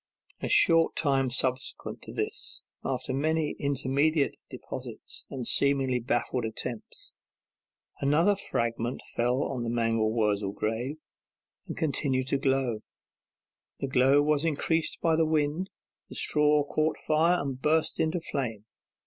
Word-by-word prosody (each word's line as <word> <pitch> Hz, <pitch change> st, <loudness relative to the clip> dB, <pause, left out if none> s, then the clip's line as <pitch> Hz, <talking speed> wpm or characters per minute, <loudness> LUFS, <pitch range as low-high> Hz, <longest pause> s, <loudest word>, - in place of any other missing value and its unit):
A -, -, -2 dB
short 165 Hz, -1 st, +5 dB
time 135 Hz, -4 st, +1 dB
subsequent 130 Hz, +1 st, -2 dB
to -, -, -10 dB
this, -, -, -4 dB, 0.2 s
after -, -, -2 dB
many 155 Hz, +2 st, 0 dB
intermediate 140 Hz, +2 st, +1 dB
deposits -, -, -6 dB
and 130 Hz, -3 st, -5 dB
seemingly 135 Hz, -3 st, +4 dB
baffled 120 Hz, +1 st, -1 dB
attempts, 110 Hz, +1 st, -5 dB, 0.9 s
another 160 Hz, +8 st, +3 dB
fragment 115 Hz, -8 st, -2 dB
fell 125 Hz, +4 st, +1 dB
on 130 Hz, -3 st, -3 dB
the 115 Hz, -, -2 dB
mangel 115 Hz, -2 st, +1 dB
wurzel 105 Hz, -3 st, 0 dB
grave, 115 Hz, +8 st, -2 dB, 0.7 s
and -, -, -6 dB
continued 135 Hz, -4 st, 0 dB
to 140 Hz, -, +1 dB
glow; 135 Hz, -4 st, +1 dB, 1.0 s
the 135 Hz, -, -2 dB
glow 135 Hz, +2 st, +4 dB
was 150 Hz, 0 st, +2 dB
increased 160 Hz, +1 st, 0 dB
by 165 Hz, -1 st, +3 dB
the 165 Hz, -, +3 dB
wind; 155 Hz, +3 st, 0 dB, 0.4 s
the -, -, -10 dB
straw 150 Hz, -1 st, +3 dB
caught 155 Hz, +2 st, 0 dB
fire 165 Hz, +3 st, +2 dB
and 135 Hz, -3 st, -4 dB
burst 160 Hz, +2 st, +1 dB
into 160 Hz, +3 st, +1 dB
flame. 120 Hz, -10 st, -4 dB
140 Hz, 130 wpm, -28 LUFS, 120-155 Hz, 1.0 s, short